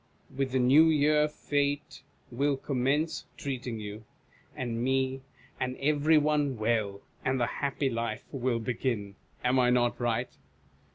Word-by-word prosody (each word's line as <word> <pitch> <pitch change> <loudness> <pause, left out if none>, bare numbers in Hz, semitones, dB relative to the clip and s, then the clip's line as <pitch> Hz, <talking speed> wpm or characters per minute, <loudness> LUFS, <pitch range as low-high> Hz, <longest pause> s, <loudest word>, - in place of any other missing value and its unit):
With 135 0 0
the 130 - +1
New 130 +5 +6
Year 150 -1 +4
Fate 145 -1 -2 0.3
will 140 +3 +1
commence 140 +4 0
treating 125 -5 -4
you, 105 +1 -7 0.5
and 120 -2 -3
me, 130 0 0 0.4
and 130 0 -2
every 150 +2 +3
one 150 -3 +1
well, 110 -3 0 0.2
and 130 0 +1
the 120 - +3 0.2
happy 140 0 0
life 115 -3 -2
will 130 -3 0
begin. 115 -3 -2 0.3
Am 125 +1 +3
I 125 -1 +4
not 120 -1 +2
ricjht 120 -2 -1
130 Hz, 135 wpm, -29 LUFS, 120-145 Hz, 0.5 s, New